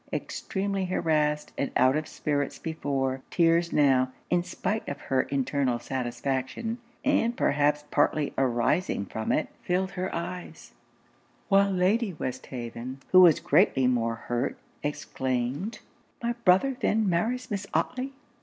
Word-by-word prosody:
Extremely 195 -1 -2
harrassed 150 -4 0
and 140 - 0
out 130 +2 +4
of 155 0 -1
spirits 145 -1 -2
before, 135 -5 -2
tears 170 0 +3
now, 130 -3 +3 0.2
in 175 0 +4
spite 200 +4 -3
of 140 - -5
her 130 -1 +1
internal 135 -2 0
satisfaction, 130 - -3 0.3
and 240 -4 +2
perhaps 145 +1 +2
partly 145 0 +2
arising 125 - +1
from 110 +3 -3
it, - - +1
filled 185 +1 0
her 185 0 -3
eyes; 175 +1 -6 0.8
while 200 0 +5
Lady 195 +3 +1
Westhaven, 125 -2 -6
who 185 - +9
was 170 -4 +7
greatly 130 -1 +3
more 115 -2 +1
hurt, 120 +2 -2 0.2
exclaimed 135 - -2 0.5
'My 235 0 +1
brother 190 +9 +4
then 220 -1 +2
marries 225 +9 0
Miss 200 -1 -3
Otley! 255 +2 -1
150 Hz, 125 wpm, -27 LUFS, 130-190 Hz, 0.8 s, who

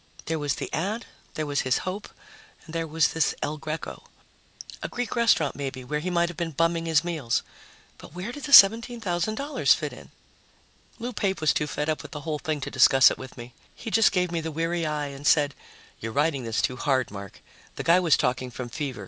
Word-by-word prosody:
There 160 0 -2
was 145 -2 -1
the - - -6
ad, 205 +9 -2 0.3
there 155 - -2
was 145 -1 0
his 130 - +1
hope, 190 +3 -5 0.6
and 160 - -12
there 165 -1 -2
was 160 -1 +2
this 160 -2 0
El 150 +1 -2
Greco. 155 +2 -6 0.7
A - - -3
Greek 245 -1 -4
restaurant, 230 - +3
maybe, 135 -2 -5
where 150 +4 -2
he 175 +4 -3
might 170 -1 +2
have 175 -2 -8
been 170 -1 -2
bumming 165 +2 0
his 160 -1 +3
meals. 155 -9 -1 0.6
But 155 - -13
where 185 +6 -5
did 290 +3 -7
the 285 - -6
$17,000 225 - +5
fit - - -5
in? - - -13 0.9
Lou 245 +1 -5
Pape 195 -4 -1
was 155 -1 +3
too 150 - -1
fed 150 +1 -3
up 155 -1 -1
with - - -11
the 150 - -6
whole 155 -1 -3
thing 155 -1 -2
to - - -5
discuss 135 -1 +6
it - - -5
with 130 0 -10
me. 120 0 -10 0.2
He 225 - -7
just 225 0 +5
gave 180 -2 0
me 170 -1 -1
the 160 - -4
weary 165 +1 -1
eye 150 -1 -2
and 140 +1 -6
said, 145 -2 +4 0.5
"You're 115 - -5
riding 140 0 0
this 115 -1 -1
too 125 - 0
hard, 130 -4 0
Mark. 100 -1 -9 0.4
The - - -4
guy 170 +2 +5
was 170 -5 +4
talking 130 0 -1
from 125 0 -7
fever. 135 -1 -4
160 Hz, 215 wpm, -26 LUFS, 140-180 Hz, 0.9 s, discuss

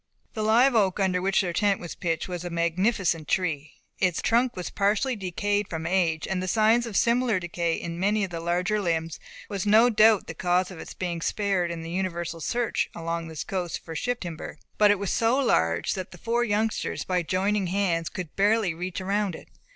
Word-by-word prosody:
The 220 - -3
live 235 +5 +4
oak, 200 -4 +2
under 185 -2 +1
which 195 +2 +2
their 180 -3 -2
tent 200 +2 +2
was 175 - -7
pitched, 165 -2 -2
was 180 -2 -5
a 175 - -4
magnificent 170 0 0
tree. 155 -6 -1 0.3
Its 180 -3 +1
trunk 240 +2 +2
was 180 - -5
partially 210 +6 +1
decayed 205 +1 -1
from 160 -1 -4
age, 170 -3 +1
and 190 -1 -1
the 185 - -3
signs 225 +4 +3
of 215 - -2
similar 235 -3 +2
decay 170 -1 -1
in 170 0 -5
many 205 +3 +1
of 190 - -3
the 165 - -4
larger 175 +5 0
limbs 165 -3 -2 0.3
was 200 -1 -3
no 225 +4 +6
doubt 215 -1 +5
the - - -6
cause 180 +3 0
of 175 - -9
its - - -9
being 175 -2 -3
spared 195 -2 0
in 170 -1 -5
the 165 - -6
universal 175 -2 -3
search 240 +7 -1
along 165 0 -3
this 160 -2 -5
coast 180 -3 -3
for 165 - -7
ship 245 +9 -2
timber; 165 -3 -6 0.2
but 210 -1 +6
it 205 - +4
was 200 -1 -3
so 230 +3 +2
large, 85 - +1
that 185 -2 -5
the 180 - -13
four 235 +4 0
youngsters 220 -1 -1
by 180 -1 +1
joining 190 +3 0
hands 175 -3 0
could 175 -4 -7
barely 205 -2 +2
reach 180 +3 -5
around 195 -1 -1
it. - - -13
185 Hz, 205 wpm, -26 LUFS, 170-210 Hz, 0.3 s, no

